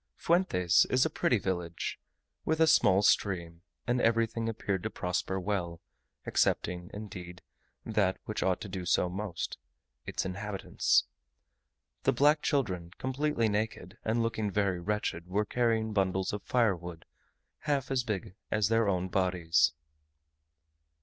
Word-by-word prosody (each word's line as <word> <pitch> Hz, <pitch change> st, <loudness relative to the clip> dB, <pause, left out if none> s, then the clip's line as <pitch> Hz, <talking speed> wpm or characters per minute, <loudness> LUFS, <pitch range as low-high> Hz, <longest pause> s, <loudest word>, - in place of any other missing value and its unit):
Fuentes 165 Hz, -, +3 dB
is 130 Hz, +2 st, +3 dB
a 160 Hz, -, -1 dB
pretty 125 Hz, -, +2 dB
village, 90 Hz, -4 st, -3 dB, 0.4 s
with 160 Hz, 0 st, 0 dB
a 160 Hz, -, +6 dB
small 100 Hz, -11 st, +5 dB
stream; 90 Hz, -5 st, +1 dB, 0.2 s
and 120 Hz, +1 st, +1 dB
everything 115 Hz, 0 st, +1 dB
appeared 105 Hz, -4 st, -2 dB
to -, -, -3 dB
prosper 90 Hz, +1 st, -2 dB
well, 90 Hz, -4 st, -2 dB, 0.5 s
excepting, 90 Hz, 0 st, 0 dB
indeed, 90 Hz, -4 st, -8 dB, 0.4 s
that 105 Hz, -4 st, +1 dB
which 110 Hz, -, -3 dB
ought 95 Hz, -1 st, +1 dB
to -, -, -5 dB
do 95 Hz, -1 st, -5 dB
so 90 Hz, 0 st, +2 dB
most 95 Hz, -1 st, -4 dB, 0.5 s
its -, -, -2 dB
inhabitants. 100 Hz, +2 st, +1 dB, 1.0 s
The -, -, +2 dB
black 150 Hz, +2 st, +4 dB
children, 95 Hz, -12 st, 0 dB
completely 130 Hz, -2 st, 0 dB
naked, 105 Hz, -1 st, -3 dB
and 115 Hz, +1 st, +1 dB
looking 110 Hz, -2 st, -1 dB
very 100 Hz, -3 st, 0 dB
wretched, 90 Hz, -3 st, -2 dB
were 100 Hz, +3 st, 0 dB
carrying 115 Hz, -2 st, +1 dB
bundles 95 Hz, -1 st, 0 dB
of 105 Hz, -, -3 dB
firewood 90 Hz, -9 st, 0 dB, 0.5 s
half 140 Hz, -3 st, -1 dB
as 130 Hz, -2 st, +1 dB
big 100 Hz, -5 st, -4 dB, 0.2 s
as 105 Hz, -1 st, +1 dB
their 115 Hz, -2 st, +3 dB
own 90 Hz, -1 st, 0 dB
bodies. 90 Hz, -5 st, +2 dB
100 Hz, 135 wpm, -30 LUFS, 90-115 Hz, 1.0 s, a